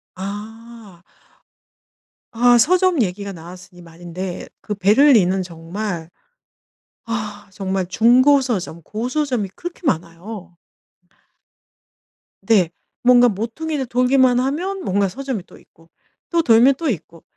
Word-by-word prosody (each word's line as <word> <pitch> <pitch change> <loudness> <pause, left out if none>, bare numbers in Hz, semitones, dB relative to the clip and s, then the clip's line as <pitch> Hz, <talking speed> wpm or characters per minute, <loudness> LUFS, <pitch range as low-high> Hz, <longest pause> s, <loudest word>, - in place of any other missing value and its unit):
아. 210 -1 -9 1.3
아. 245 +1 +5
서점 360 +3 +3
얘기가 200 +1 -4
나왔으니 180 +1 -12
말인데 175 +2 -7
그 210 - -4
베를린은 200 -2 +4
정말 170 +1 -6 1.0
아 210 -3 -5
정말 190 -1 -2
중고 250 +8 +4
서점, 190 -10 -3
고서점이 245 - -2
그렇게 350 +1 -8
많아요. 175 0 -4 1.9
네. 200 -7 +3 0.3
뭔가 245 0 +6
모퉁이를 265 +8 -3
돌기만 250 +1 +3
하면 350 +9 -2
뭔가 200 - +1
서점이 260 -5 -5
또 - - -17
있고 165 +1 -24 0.4
또 340 -1 +2
돌면 245 0 +5
또 320 +2 -2
있고. 170 - -6
215 Hz, 220 characters per minute, -20 LUFS, 185-255 Hz, 1.9 s, 뭔가